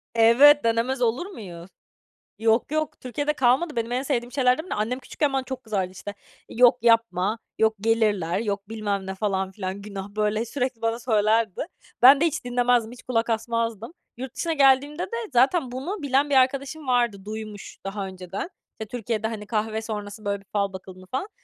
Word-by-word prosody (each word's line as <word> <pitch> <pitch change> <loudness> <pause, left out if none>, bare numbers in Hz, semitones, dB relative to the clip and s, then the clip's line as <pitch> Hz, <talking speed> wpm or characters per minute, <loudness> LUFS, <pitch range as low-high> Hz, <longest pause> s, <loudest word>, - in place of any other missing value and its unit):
Evet, 255 +6 +7
denemez 230 +3 0
olur 240 +8 +1
muyum? 185 - -9 0.7
Yok, 225 +5 +2
yok, 310 -1 -2
Türkiye'de 290 +4 -2
kalmadı. 265 +2 +2
Benim 230 +1 -2
en 255 +2 0
sevdiğim 245 -3 -2
şeylerden 265 +4 +2
biri. - - -3
Annem 230 +5 -1
küçükken 285 +1 -2
bana 265 -1 0
çok 260 -1 -7
kızardı. 195 -4 -2
İşte 205 +2 -8 0.3
"Yok 245 +1 +5
yapma, 230 -3 +2 0.2
yok 220 0 +3
gelirler, 210 -6 +1
yok 205 -2 -3
bilmem 205 -3 -3
ne." 190 - -4
falan 190 -2 -1
filan. 190 0 -5
Günah, 200 -1 -7
böyle 215 +2 0
sürekli 250 -1 -3
bana 230 +1 0
söylerdi. 220 - +1 0.4
Ben 275 +3 +9
de 335 - +4
hiç 310 -5 -2
dinlemezdim, 245 -2 +1
hiç 245 - -12
kulak 235 -2 0
asmazdım. 230 - -2 0.2
Yurt 255 0 -7
dışına 335 -1 -1
geldiğimde 285 +2 +3
de 465 - -5 0.2
zaten 260 +2 +3
bunu 310 +8 -4
bilen 280 +1 +2
bir - - +2
arkadaşım 275 +3 +1
vardı. 240 -6 +1
Duymuş 215 -1 -7
daha 195 0 -4
önceden 185 - -6 0.4
Türkiye'de, 225 -2 -2
hani, 210 -2 -6
kahve 220 0 -2
sonrası 210 -1 -6
böyle 200 0 -1
bir 195 - -23
fal 200 -2 0
bakıldığını 185 0 -10
falan. 265 - -3
230 Hz, 175 wpm, -25 LUFS, 210-260 Hz, 0.7 s, Ben